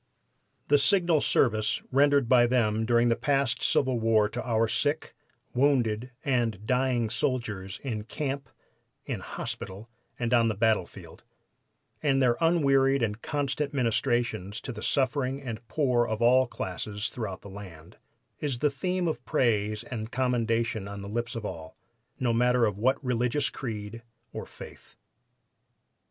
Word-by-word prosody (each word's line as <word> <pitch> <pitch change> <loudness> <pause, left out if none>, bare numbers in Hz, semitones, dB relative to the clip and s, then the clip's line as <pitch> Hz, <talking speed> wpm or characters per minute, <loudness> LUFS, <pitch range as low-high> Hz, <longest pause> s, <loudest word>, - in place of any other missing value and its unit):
The 145 0 +5
signal 170 -1 +3
service 110 -4 +2
rendered 140 -1 +4
by 120 -1 +5
them 110 -3 +1
during 120 0 +4
the 115 - +3
past 135 -1 0
civil 130 -3 +2
war 110 -2 +3
to 120 +3 -4
our 115 -2 +1
sick, 145 +7 -1 0.4
wounded 125 -4 +2 0.2
and 115 -7 0
dying 125 -2 +1
soldiers 110 -6 -2
in 110 -6 -3
camp, 140 0 -4 0.6
in - - -3
hospital 100 +5 -7 0.3
and 120 0 -1
on 115 -1 +5
the 110 - 0
battlefield, 110 +1 -1 0.8
and 135 -2 +2
their 125 -3 +3
unwearied 140 -5 +3
and 110 0 -2
constant 145 0 -2
ministrations 115 -4 0
to - - -5
the 110 -2 -8
suffering 135 +1 0
and 120 -4 -7
poor 125 -3 +1
of 110 -1 -2
all 125 +2 +5
classes 105 +1 -4
throughout 105 -6 -5
the - - -11
land, 90 -5 -11 0.4
is 140 -5 -2
the 145 +4 +1
theme 180 +5 -1
of 140 -7 -3
praise 105 -4 +1
and 115 -2 -6
commendation 115 -4 0
on 100 0 -7
the 100 - -7
lips 115 +2 -3
of 115 -2 -4
all, 80 -5 -7 0.4
no 120 -3 +1
matter 125 +1 +3
of 105 -2 -2
what 130 +4 +3
religious 125 +3 0
creed 110 -2 -6 0.3
or - - -6
faith. - - -13
120 Hz, 145 wpm, -28 LUFS, 110-135 Hz, 0.8 s, The